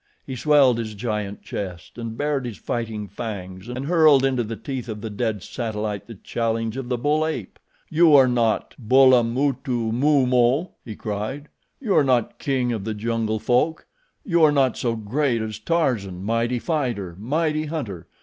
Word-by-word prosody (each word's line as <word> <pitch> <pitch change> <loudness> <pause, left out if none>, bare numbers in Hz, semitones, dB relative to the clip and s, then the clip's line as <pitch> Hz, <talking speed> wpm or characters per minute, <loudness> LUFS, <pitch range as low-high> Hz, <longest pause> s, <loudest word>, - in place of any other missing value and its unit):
He 130 - -5
swelled 135 -3 +4
his 110 -2 -4
giant 105 -2 -4
chest 90 +2 -6
and 115 -1 -5
bared 145 -3 -1
his 115 - -7
fighting 110 -3 -4
fangs, 95 -2 -7
and 125 +2 -4
hurled 155 -4 +5
into 130 -3 +1
the 115 +1 -5
teeth 130 0 -6
of 105 -1 -5
the 110 -1 -5
dead 105 -2 -2
satellite 105 -4 -4
the 115 - -9
challenge 115 +2 -2
of 130 -2 -5
the 125 - 0
bull 150 +5 +1
ape. 155 -11 -4 0.3
"You 160 -1 +5
are 135 -2 +7
not 120 -3 +1
Bulamutumumo," 130 +2 +3
he 110 -4 -7
cried. 110 +9 -5 0.3
"You 220 -8 0
are 150 - +5
not 125 -4 +1
king 130 -3 0
of 110 -4 -4
the 110 +1 -3
jungle 110 0 -1
folk. 125 +9 +1 0.4
You 170 -5 +3
are 155 - +7
not 135 -4 +2
so 115 -2 -1
great 120 +3 0
as 110 -1 -4
Tarzan, 110 - -1
mighty 115 +3 0
fighter, 120 - -2
mighty 155 +6 0
hunter. 115 - -5
120 Hz, 165 wpm, -23 LUFS, 110-140 Hz, 0.4 s, are